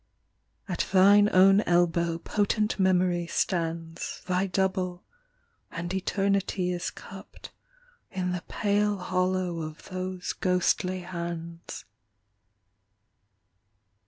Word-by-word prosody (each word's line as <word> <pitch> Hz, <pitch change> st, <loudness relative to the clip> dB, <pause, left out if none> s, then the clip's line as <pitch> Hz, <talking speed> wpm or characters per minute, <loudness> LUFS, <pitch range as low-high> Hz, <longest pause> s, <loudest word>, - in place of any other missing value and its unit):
At 180 Hz, -3 st, -2 dB
thine 200 Hz, +2 st, +6 dB
own 195 Hz, +2 st, +6 dB
elbow 170 Hz, -1 st, +2 dB
potent 210 Hz, +4 st, 0 dB
Memory 180 Hz, -2 st, +2 dB
stands, 165 Hz, -2 st, -2 dB
Thy 185 Hz, +1 st, 0 dB
double, 185 Hz, -1 st, -1 dB, 0.7 s
and 175 Hz, +2 st, -5 dB
eternity 195 Hz, -1 st, 0 dB
is 175 Hz, -1 st, -2 dB
cupped -, -, -12 dB, 0.6 s
In 180 Hz, -1 st, -2 dB
the 180 Hz, -1 st, -3 dB
pale 205 Hz, 0 st, +1 dB
hollow 185 Hz, -1 st, -1 dB
of 155 Hz, 0 st, -8 dB
those 185 Hz, 0 st, -4 dB
ghostly 180 Hz, 0 st, 0 dB
hands. 170 Hz, -1 st, -6 dB
180 Hz, 90 wpm, -27 LUFS, 175-190 Hz, 0.7 s, thine